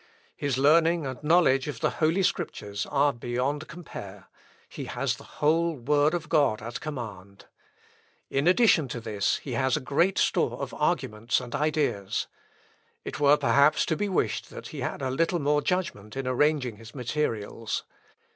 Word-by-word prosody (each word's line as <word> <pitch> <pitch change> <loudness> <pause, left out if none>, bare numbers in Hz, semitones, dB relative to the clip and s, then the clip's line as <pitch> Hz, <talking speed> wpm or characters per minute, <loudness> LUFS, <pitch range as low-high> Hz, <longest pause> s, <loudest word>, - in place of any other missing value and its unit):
His 140 -3 -1
learning 160 +3 +4
and 130 -2 -5
knowledge 150 -4 +4
of 140 -6 -5
the - - +1
Holy 165 +5 +3
Scriptures 105 - -2
are 145 0 +2
beyond 125 +6 -2
compare: 100 - -10 0.4
he - - -7
has - - -1
the - - -14 0.2
whole 165 +2 +3
word 145 +5 +2
of 175 -1 -4
God 145 -9 +2
at 115 +2 -6
command. 100 - -7 0.8
In 140 +4 0
addition 180 - +5
to 125 - -5
this 105 -3 0
he 135 - -6
has 130 +1 +1
great 165 +8 +1
store - - +1
of - - -5
arguments 110 +3 0
and 125 -2 -8
ideas. 145 -10 0 0.8
It - - -5
were 145 0 +5
perhaps 140 +1 +4
to 160 - 0
be 205 +4 -1
wished 185 - -1
that - - -9
he - - -7
had - - -3
a 130 - -1
little 165 +6 +1
more 145 -1 +2
judgment 170 - -2
in 135 - -3
arranging 130 -3 +1
his 115 +3 -13
materials. 115 -5 -2
140 Hz, 160 wpm, -27 LUFS, 120-155 Hz, 0.8 s, addition